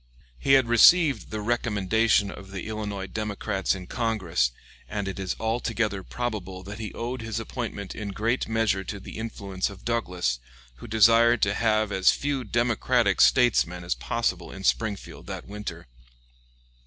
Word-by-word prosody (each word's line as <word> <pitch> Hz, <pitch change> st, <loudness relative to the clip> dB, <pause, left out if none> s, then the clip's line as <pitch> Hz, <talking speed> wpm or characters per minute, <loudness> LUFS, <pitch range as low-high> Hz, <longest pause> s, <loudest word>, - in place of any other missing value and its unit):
He 135 Hz, -, +3 dB
had 135 Hz, -3 st, +5 dB
received 140 Hz, +2 st, +5 dB
the 110 Hz, 0 st, -4 dB
recommendation 110 Hz, -2 st, +1 dB
of 95 Hz, -, -11 dB
the 95 Hz, -2 st, -6 dB
Illinois 105 Hz, -3 st, -4 dB
Democrats 105 Hz, -1 st, -2 dB
in 95 Hz, -1 st, -8 dB
Congress, 95 Hz, -, 0 dB, 0.4 s
and 100 Hz, -2 st, -3 dB
it 95 Hz, -, -5 dB
is 95 Hz, -2 st, -2 dB
altogether 110 Hz, -3 st, -1 dB
probable 95 Hz, -4 st, -5 dB
that 100 Hz, +3 st, -8 dB
he 110 Hz, -2 st, -5 dB
owed 120 Hz, +1 st, -4 dB
his 115 Hz, 0 st, -3 dB
appointment 115 Hz, -4 st, -5 dB
in 105 Hz, -2 st, -5 dB
great 115 Hz, +5 st, -1 dB
measure 110 Hz, -4 st, +1 dB
to 100 Hz, +1 st, -6 dB
the 95 Hz, -, -9 dB
influence 100 Hz, -4 st, -3 dB
of 100 Hz, -2 st, -13 dB
Douglas, 90 Hz, -, -1 dB, 0.4 s
who -, -, -10 dB
desired 115 Hz, +2 st, +5 dB
to 100 Hz, -, +2 dB
have 110 Hz, -1 st, +1 dB
as 95 Hz, -1 st, +4 dB
few 145 Hz, -2 st, 0 dB
Democratic 120 Hz, -1 st, +1 dB
statesmen 95 Hz, -8 st, +4 dB
as 85 Hz, -, 0 dB
possible 90 Hz, -7 st, -2 dB
in 95 Hz, -, -9 dB
Springfield 105 Hz, -1 st, -1 dB
that -, -, -6 dB
winter. 105 Hz, +1 st, -7 dB
110 Hz, 155 wpm, -26 LUFS, 95-115 Hz, 0.4 s, had